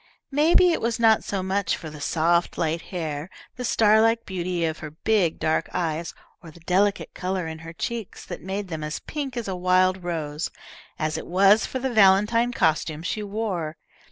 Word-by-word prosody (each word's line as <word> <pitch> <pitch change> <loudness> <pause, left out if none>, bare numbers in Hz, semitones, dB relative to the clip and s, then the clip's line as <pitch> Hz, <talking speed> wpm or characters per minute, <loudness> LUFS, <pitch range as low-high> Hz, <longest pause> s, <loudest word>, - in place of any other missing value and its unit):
Maybe 330 +5 +5
it 330 - -1
was 230 0 -1
not 225 -2 +4
so 195 -2 -3
much 195 +1 0
for 160 -3 -8
the 150 -1 -10
soft 170 +3 +1
light 165 0 0
hair, 160 -3 -4 0.3
the 250 - -5
star 220 -2 +4
like 225 +1 +2
beauty 180 -2 -2
of 160 0 -3
her 155 - -6
big 175 +2 +1
dark 160 0 0
eyes, 165 -2 -2 0.3
or 170 - -11
the 160 - -15
delicate 195 +4 +1
colour 185 -1 -2
in 160 0 -6
her 165 0 -9
cheeks 225 +4 -5
that - - -7
made 195 +2 -4
them 160 -3 -4
as 150 +1 -3
pink 275 -4 -5
as 235 - -3
a 190 - -2
wild 185 +1 +2
rose, 160 -3 -3 0.5
as 155 -1 -1
it - - -9
was 195 +4 +4
for - - -4
the 260 -1 -2
valentine 215 +4 +4
costume 160 -5 0
she 210 +4 -2
wore. 200 -7 -3
185 Hz, 190 wpm, -24 LUFS, 165-215 Hz, 0.5 s, Maybe